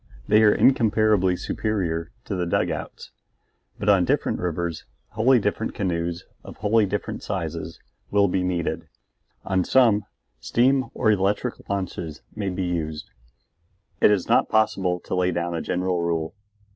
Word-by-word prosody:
They 105 - +5
are 105 -1 +6
incomparably 110 -7 +3
superior 85 -8 -2 0.2
to - - -4
the 90 -2 -1
dugouts. - - -2 0.7
But - - -5
on 100 -3 +5
different - - 0
rivers 85 -1 -3 0.3
wholly 120 +5 +3
different 105 +1 -2
canoes, 85 -3 -2 0.2
of - - -11
wholly 105 0 +2
different 100 +1 -4
sizes, 80 -2 -4 0.3
will 100 0 +3
be 95 0 0
needed; 90 -2 -2 0.6
on 95 -1 +1
some 115 -5 +3 0.3
steam 130 - +2
or 110 - +3
electric 105 +4 -1
launches 90 -5 -4
may 100 -2 -2
be 95 0 -3
used; 80 -4 -3 0.9
it - - +6
is 100 -4 +1
not - - +3
possible 95 -5 +1
to - - -7
lay 90 0 +2
down 85 -1 -2
a 85 - -2
general 90 0 -1
rule. 85 -1 -1
95 Hz, 145 wpm, -24 LUFS, 85-105 Hz, 0.9 s, are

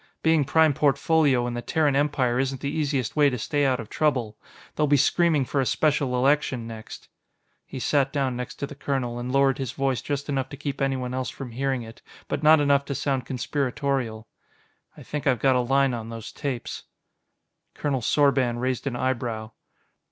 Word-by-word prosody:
Being 160 -3 +3
Prime 160 +1 +4
Portfolio 140 -2 +2
in 120 - -3
the 120 - -3
Terran 150 +1 +1
Empire 135 -4 +1
isn't 135 0 -1
the 140 - -2
easiest 145 -5 -1
way 145 -2 +5
to 125 - -3
stay 145 +5 0
out 130 -1 +1
of 115 - -6
trouble. 125 -8 0 0.4
They'll 150 - +2
be 145 0 +4
screaming 160 0 +3
for 135 +2 0
a - - 0
Special 145 -4 +1
Election 130 -2 +1
next." 110 -1 -9 0.6
He - - -7
sat 135 +1 +1
down 135 -3 -1
next 125 0 -5
to - - -4
the 145 - -9
colonel 130 -4 -2
and 125 +1 -4
lowered 135 0 +3
his 130 -4 -3
voice 135 -2 0
just 145 -1 -3
enough 135 -2 -1
to 140 - -8
keep 140 0 -4
anyone 130 -2 -1
else 130 0 -2
from 130 -3 -8
hearing 130 +1 -1
it, 115 0 -12 0.3
but - - -2
not 155 0 +6
enough 140 -1 +3
to 140 - -4
sound 130 -3 -1
conspiratorial. 130 -3 -2 0.7
"I - - -11
think 150 -1 -4
I've 130 -2 +3
got 130 +2 +3
a - - +3
line 135 +1 +2
on 115 -1 -5
those 115 -1 -7
tapes." 135 -5 -5 0.9
Colonel 140 -3 -1
Sorban 130 -2 +2
raised 130 +2 -2
an 130 - -2
eyebrow. 120 -3 -2
135 Hz, 190 wpm, -25 LUFS, 125-145 Hz, 0.9 s, not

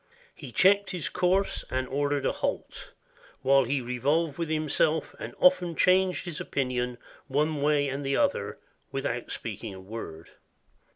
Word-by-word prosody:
He - - -10
checked 200 +2 +4
his 180 -4 -3
course, 185 +2 +1
and 130 0 -1
or 145 +1 0
dered 145 -2 -1
a - - +3
halt, - - -4 0.5
while 135 0 +5
he 135 +2 0
revolved 140 +6 0
with 165 -2 -2
himself, 155 0 +1
and - - -7
often 180 -12 +4
changed 185 +1 +3
his 170 -4 -5
opinion 125 -2 -2 0.3
one 150 +2 0
way 145 -1 +3
and 135 +1 -3
the 135 0 0
other, - - 0 0.3
without 135 -3 -3
speaking 105 -2 -5
a - - -9
word. 95 -5 -8
145 Hz, 155 wpm, -28 LUFS, 130-165 Hz, 0.5 s, while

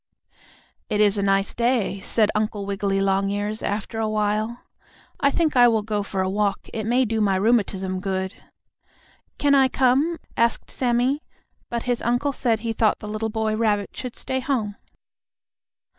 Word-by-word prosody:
"It 210 - 0
is 205 -1 +4
a - - +1
nice 195 0 +1
day," 235 -5 0
said 210 +2 +1
Uncle 215 -1 -1
Wiggily 195 0 -1
Longears, 200 +2 0
after 215 +2 -3
a 220 -1 0
while. 215 +2 -1 0.6
"I 280 - +4
think 315 0 0
I 245 -1 +7
will 220 -2 +2
go 210 -1 -1
for 195 -1 -2
a - - -1
walk. 200 +1 -1
It 220 -1 -3
may 250 +2 +3
do 220 -1 -1
my 195 -2 +2
rheumatism 195 -3 +1
good." 190 0 -2 1.0
"Can 285 -1 +3
I 270 -1 +6
come?" 270 +6 +2 0.2
asked 235 0 +1
Sammie, 250 +3 +1 0.5
but 235 -1 -2
his 245 -1 -1
uncle 245 +4 0
said 230 -4 0
he 230 -1 -2
thought 220 -1 +2
the 210 - -9
little 215 +1 -2
boy 220 0 -1
rabbit 210 -3 0
should 250 -2 -6
stay 260 - -3
home. 240 -6 -1
215 Hz, 165 wpm, -23 LUFS, 200-240 Hz, 1.0 s, I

